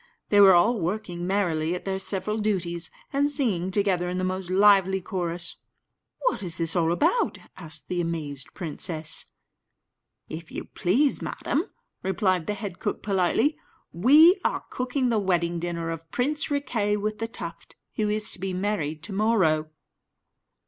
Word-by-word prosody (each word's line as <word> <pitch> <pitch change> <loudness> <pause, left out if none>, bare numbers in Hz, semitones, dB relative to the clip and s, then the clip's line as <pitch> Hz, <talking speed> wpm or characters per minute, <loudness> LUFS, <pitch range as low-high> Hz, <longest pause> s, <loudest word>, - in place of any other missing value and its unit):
They 205 -1 +6
were 190 -2 +8
all 220 +7 +3
working 175 -1 -3
merrily 175 -4 0
at 180 - -7
their 190 -1 -2
several 210 +3 -2
duties, 175 -5 -1 0.2
and 285 +1 +2
singing 225 - 0
together 190 -3 +1
in 180 - -3
the 185 - -1
most 185 0 -3
lively 190 0 +5
chorus. 175 -2 -3 0.6
"What - - 0
is 180 -2 -2 0.2
all 170 -2 +2
this 165 - +2
about?" 335 - +1 0.2
asked 160 -4 -6
the 180 -1 -1
amazed 150 -5 -4
princess. 160 -2 -3 1.0
"If 160 +1 -8
you - - -6
please, 260 +11 +2
madam," 320 +6 -2 0.4
replied 185 -2 0
the 210 - -1
head 195 -3 -6
cook, 205 - -3
politely, 210 - +1 0.3
"we 305 - +6
are - - -1
cooking 255 0 -1
the 225 -2 +2
wedding 175 -3 0
dinner 170 -1 -3
of 165 0 -7
Prince 285 +4 0
Riquet 230 -8 0
with 215 +1 -3
the 225 - -2
Tuft, 230 - -8 0.2
who 215 -1 -1
is 215 0 +2
to - - -3
be 190 0 -3
married 165 -6 -2
to 200 - -4
morrow." 190 -8 +2
190 Hz, 155 wpm, -26 LUFS, 170-215 Hz, 1.0 s, were